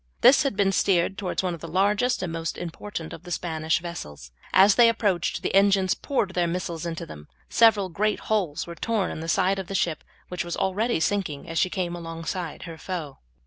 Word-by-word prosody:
This 255 +3 +7
had 270 -5 0
been 195 -1 +2
steered 190 0 +2
towards 195 -1 -2
one 180 -2 -1
of 170 - -7
the 165 - -7
largest 205 +7 +1
and 170 -3 -3
most 165 0 -3
important 170 -1 -6
of - - -9
the 180 - -12
Spanish 160 -2 -1
vessels. 75 - -8 0.2
As 195 +2 +7
they 235 0 +6
approached, 205 -6 0
the - - -1
engines 195 -1 +4
poured 210 -9 -1
their 175 -1 +1
missiles 170 -1 -3
into 165 -1 -4
them. 75 -1 -11 0.2
Several 220 -4 +5
great 210 +4 -1
holes 190 -9 -1
were 170 - -7
torn 210 +3 -1
in - - -6
the 165 - -5
sides 190 +4 +2
of 190 - -5
the 195 - -4
ship, 165 -4 0 0.2
which 180 - -3
was 175 0 -4
already 205 +2 0
sinking 165 -5 -1
as 165 0 -1
she 185 - +2
came 175 -2 -2
alongside 165 0 -5
her 165 -2 -9
foe. 165 -7 -5
180 Hz, 210 wpm, -25 LUFS, 165-200 Hz, 0.2 s, This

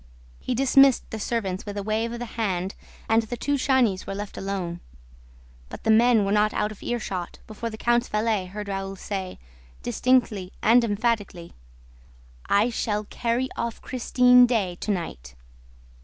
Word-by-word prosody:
He 255 - -2
dismissed 270 +1 +5
the 220 - -4
servants 200 -4 -2
with 205 -1 -7
a 200 - -3
wave 220 +2 -1
of 235 - -5
the 240 - -5
hand 195 -4 -2 0.3
and 225 +1 +4
the 230 +2 -6
two 285 - -1
Chagnys 255 -8 +1
were 195 - -4
left 205 0 -6
alone. 185 -3 -4 0.9
But - - -9
the 220 - +3
men 225 -1 +5
were 195 - -1
not 210 +1 +2
out 210 0 0
of 215 - -12
earshot 195 -7 -4
before 225 +2 -5
the 220 - -8
count's 240 +2 +1
valet 210 -3 0
heard 205 +2 -7
Raoul 195 0 -4
say, 190 -1 -5 0.5
distinctly 210 - +1
and 235 +3 +5
emphatically: 205 -5 -2 0.9
"I 215 +4 +3
shall 210 -2 -1
carry 240 +2 -1
off 235 -1 -3
Christine 250 0 +4
Daae 205 -7 0
to - - -6
night." 65 - -4
215 Hz, 160 wpm, -25 LUFS, 195-240 Hz, 0.9 s, dismissed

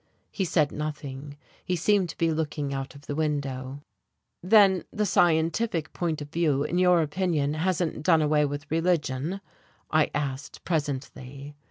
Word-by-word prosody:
He 195 - -1
said 155 -4 +2
nothing 145 -2 -6 0.3
he 180 - -1
seemed 190 +1 +2
to - - -8
be 165 -1 +2
looking 150 -3 -2
out 135 +1 -5
of 140 0 -14
the - - -4
window. 140 -3 -3 0.6
"Then 190 -1 +5
the 210 - 0
scientific 165 0 +1
point 160 -4 -2
of 145 - -13
view 150 -5 +1
in 175 - -1
your 180 -2 +5
opinion 150 -2 0
hasn't 165 0 -1
done 160 0 +4
away 150 0 +3
with 145 +1 -4
religion?" 165 0 0 0.5
I 155 -1 +3
asked 140 -1 -4
presently. 140 -2 -4
155 Hz, 150 wpm, -26 LUFS, 145-175 Hz, 0.6 s, Then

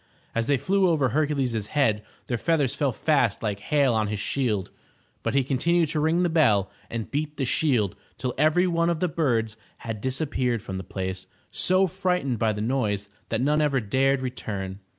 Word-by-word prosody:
As 115 0 -1
they 140 - +3
flew 190 +6 +2
over 145 -6 +2
Hercules' 135 -7 0
head, 115 -8 +1 0.2
their 120 -2 -2
feathers 145 -4 +1
fell 140 -1 0
fast 130 -5 +1
like 105 -2 -2
hail 140 +3 +2
on 110 -1 +1
his 105 -1 -3
shield, 105 -3 -1 0.5
but - - -2
he 135 - +4
continued 160 +5 +1
to 155 - -1
ring 160 +4 +2
the - - +3
bell 110 - +3 0.2
and 115 -2 -5
beat 150 +1 -2
the 135 - 0
shield 120 - +1 0.2
till 125 -2 -3
every 155 +5 +3
one 170 -1 +1
of 170 -2 0
the 180 - +1
birds 120 -9 0 0.3
had 110 -2 -4
disappeared 130 -3 -1
from 95 0 -5
the - - -6
place, 95 +1 -5 0.2
so 185 +1 +4
frightened 180 - -1
by 110 0 +2
the 105 0 -4
noise 105 -4 -1 0.2
that 115 +1 0
none 150 +3 +2
ever 140 -3 +2
dared 130 +5 +1
return. 100 -6 -5
130 Hz, 190 wpm, -25 LUFS, 110-155 Hz, 0.5 s, he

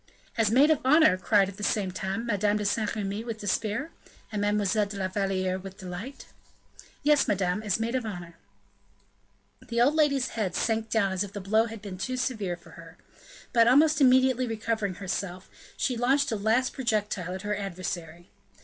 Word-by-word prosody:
"As 225 -3 +2
maid 275 +7 +5
of 305 - +3
honor!" 300 - +5
cried, 195 +1 +3
at 195 0 -9
the 210 - -7
same 200 -2 0
time, 190 +5 -3
Madame 205 -2 +1
de 210 - -3
Saint 210 +2 0
Remy 205 +1 -3
with 230 -2 -5
despair, 215 - -2 0.4
and 210 -2 -2
Mademoiselle 205 0 +1
de 200 0 -7
la 190 -1 -1
Valliere 185 -1 -1
with 190 0 -10
delight. 190 +9 -8 0.8
"Yes, 295 0 +4
madame, 195 0 0
as 210 -1 -1
maid 230 +2 -2
of 260 -2 0
honor." 175 -6 -7 1.3
The 235 - -3
old 260 +5 +4
lady's 280 -4 +2
head 200 -6 -3
sank 225 -1 0
down 205 -3 +1
as 190 +1 -1
if 200 -1 -9
the 205 - -5
blow 215 +4 +2
had 225 -2 -9
been 190 -3 -7
too 255 +7 -3
severe 215 -8 -2
for 170 - -17
her. 165 0 -13 0.6
But, 230 -2 +5
almost 300 +5 +5
immediately 255 -1 +4
recovering 220 -3 -2
herself, 190 -1 -5 0.3
she 255 - 0
launched 270 +3 +2
a - - 0
last 220 +5 +1
projectile 210 -7 -2
at 190 - -7
her 210 0 -1
adversary. 175 -3 -6
210 Hz, 185 wpm, -27 LUFS, 190-235 Hz, 1.3 s, maid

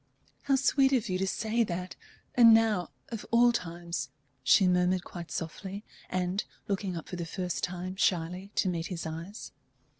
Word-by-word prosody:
"How 275 - +4
sweet 275 0 +3
of 235 -4 +1
you 185 0 0
to 190 - 0
say 225 +4 +1
that! 180 -2 -4 0.4
and 230 -2 +8
now, 215 -6 +2 0.2
of 225 -3 -5
all 240 +1 +6
times," 170 - -4 0.3
she 190 +8 +6
murmured 180 0 +2
quite 170 -1 -8
softly, 190 +5 -5 0.3
and 185 +2 -1 0.2
looking 195 -3 -2
up 165 - -7
for 180 - -6
the 175 - -3
first 180 0 -3
time, 180 +1 -3
shyly, 180 +1 0
to - - +2
meet 170 -2 -1
his 175 -3 -5
eyes. 165 +6 -6
185 Hz, 170 wpm, -30 LUFS, 175-215 Hz, 0.4 s, and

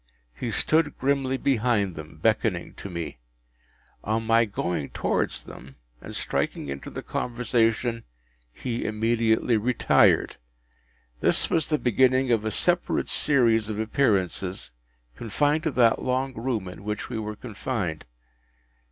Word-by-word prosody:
He - - -4
stood 155 -2 +1
grimly 135 -1 0
behind 115 -8 +1
them, 80 -1 -10
beckoning - - 0
to 100 - -8
me. 85 -7 -5 0.8
On 110 +2 -1
my 115 +1 +4
going 90 -7 -3
towards - - -1
them, 65 +1 -12 0.3
and - - -8
striking - - -2
into 70 0 -6
the - - -7
conversation, 115 -1 0 0.5
he 120 - -4
immediately 115 +1 +1
retired. 120 +3 +3 0.8
This - - +1
was 160 -3 +2
the 155 - +1
beginning 130 +1 +3
of 110 -2 +2
a - - +1
separate 175 - +1
series 115 -6 +3
of 105 - -3
appearances, 100 - 0 0.4
confined 145 - 0
to 160 - +1
that 120 -3 +4
long 130 +1 -1
room 115 -4 -2
in 90 +2 -9
which 105 +1 -3
we 120 -3 -4
were 105 0 -4
confined. 105 -7 -4
115 Hz, 130 wpm, -26 LUFS, 105-130 Hz, 0.8 s, my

